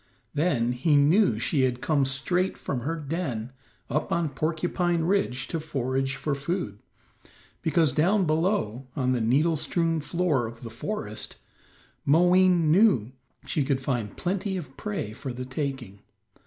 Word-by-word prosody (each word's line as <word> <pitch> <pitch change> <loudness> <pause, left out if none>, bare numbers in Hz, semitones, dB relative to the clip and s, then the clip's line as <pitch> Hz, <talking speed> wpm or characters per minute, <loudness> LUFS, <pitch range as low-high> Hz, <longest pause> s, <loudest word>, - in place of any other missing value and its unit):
Then 140 -7 +1
he 145 +5 +2
knew 150 - +4
she 135 +5 +1
had 125 -1 +1
come 140 0 +2
straight 175 +8 0
from 135 - -3
her 145 +7 -2
den 145 -7 -3 0.4
up 150 +4 -2
on 170 -2 +1
Porcupine 170 +3 0
Ridge 160 -8 0
to 165 - -2
forage 135 -3 -2
for 150 - -2
food, 140 - -3 0.8
because 160 -2 +2
down 180 +8 +2
below, 155 - 0
on 130 -2 +1
the 125 -2 +1
needle 145 +9 +3
strewn 165 +1 0
floor 150 -6 0
of 115 +1 -10
the 115 - -7
forest, 110 - -5 0.7
Moween 175 +1 +4
knew 170 - +4 0.3
she 150 - 0
could 135 -1 0
find 120 -6 -3
plenty 190 +1 -1
of 140 -7 -8
prey 200 - -4
for 130 +4 -6
the 125 +1 -6
taking. 130 -6 -4
145 Hz, 145 wpm, -26 LUFS, 130-170 Hz, 0.8 s, knew